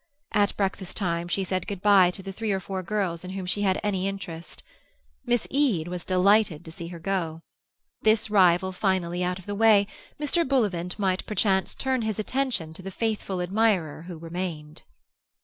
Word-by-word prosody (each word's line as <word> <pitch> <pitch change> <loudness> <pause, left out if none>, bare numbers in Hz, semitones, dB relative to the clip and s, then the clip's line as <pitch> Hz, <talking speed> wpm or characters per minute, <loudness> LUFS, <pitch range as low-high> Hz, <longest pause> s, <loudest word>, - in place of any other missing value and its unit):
At 205 -1 +2
breakfast 195 -2 -2
time 170 -3 -1
she 190 +2 0
said 185 -1 -2
good 200 -2 -4
bye 200 -3 +7
to 190 +2 -8
the 195 - -5
three 215 +2 -2
or 195 - +1
four 190 0 -4
girls 185 -3 -2
in 185 - -7
whom 190 0 -4
she 195 +3 -1
had 190 -2 +2
any 195 -2 0
interest. 175 -4 -7 0.6
Miss 240 -2 +2
Eade 245 - +2
was 180 -1 -5
delighted 185 -3 +3
to 160 - -9
see 170 +1 -7
her 175 0 -7
go. 165 -2 -2 0.6
This 220 0 +3
rival 190 -2 +4
finally 180 -2 0
out 180 0 -1
of 185 - -12
the 205 - -4
way, 210 -1 +5 0.3
Mr. 300 +3 +1
Bullivant 205 - 0
might 190 -2 0
perchance 195 -2 +1
turn 260 -2 0
his 220 -2 -2
attention 225 -8 -1
to 175 - -12
the 190 - -6
faithful 200 -3 -2
admirer 185 -5 +1
who 175 -3 -7
remained. 165 -2 -5
190 Hz, 185 wpm, -26 LUFS, 175-210 Hz, 0.6 s, bye